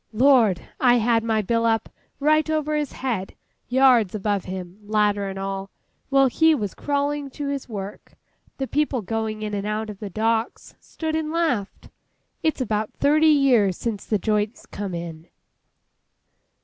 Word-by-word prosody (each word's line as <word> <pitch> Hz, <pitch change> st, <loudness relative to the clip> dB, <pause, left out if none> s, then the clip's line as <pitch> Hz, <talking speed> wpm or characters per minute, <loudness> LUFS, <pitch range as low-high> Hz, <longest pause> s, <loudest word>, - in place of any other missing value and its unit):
Lord! 230 Hz, -6 st, +4 dB
I 245 Hz, -2 st, +5 dB
had 230 Hz, -1 st, +2 dB
my 220 Hz, -1 st, +1 dB
bill 230 Hz, +3 st, +1 dB
up, 225 Hz, -1 st, +1 dB, 0.3 s
right 310 Hz, +2 st, +3 dB
over 305 Hz, -1 st, 0 dB
his 295 Hz, -2 st, -1 dB
head, 225 Hz, -8 st, -3 dB, 0.3 s
yards 245 Hz, -6 st, +4 dB
above 205 Hz, -1 st, -1 dB
him, 185 Hz, +1 st, -7 dB
ladder 205 Hz, -1 st, +1 dB
and 195 Hz, -, -6 dB
all, 195 Hz, 0 st, -4 dB, 0.4 s
while 275 Hz, 0 st, +5 dB
he 320 Hz, +5 st, +4 dB
was 210 Hz, -8 st, -3 dB
crawling 285 Hz, 0 st, -1 dB
to 285 Hz, +1 st, -5 dB
his 280 Hz, -2 st, -4 dB
work. 200 Hz, -2 st, -7 dB, 0.4 s
The 270 Hz, -, -2 dB
people 280 Hz, -4 st, 0 dB
going 220 Hz, +1 st, -3 dB
in 210 Hz, -1 st, -4 dB
and 200 Hz, 0 st, -2 dB
out 215 Hz, 0 st, -2 dB
of 200 Hz, -, -12 dB
the 210 Hz, -, -5 dB
docks, 225 Hz, +3 st, -1 dB
stood 315 Hz, -1 st, -4 dB
and 315 Hz, -1 st, -2 dB
laughed!—It's 315 Hz, 0 st, -3 dB
about 215 Hz, -3 st, -1 dB
thirty 310 Hz, +2 st, +3 dB
years 255 Hz, -, +4 dB
since 220 Hz, -4 st, -3 dB
the 215 Hz, -, 0 dB
joints 210 Hz, +1 st, -1 dB
come 195 Hz, -3 st, -5 dB
in. 170 Hz, -1 st, -7 dB
225 Hz, 155 wpm, -23 LUFS, 205-280 Hz, 0.4 s, I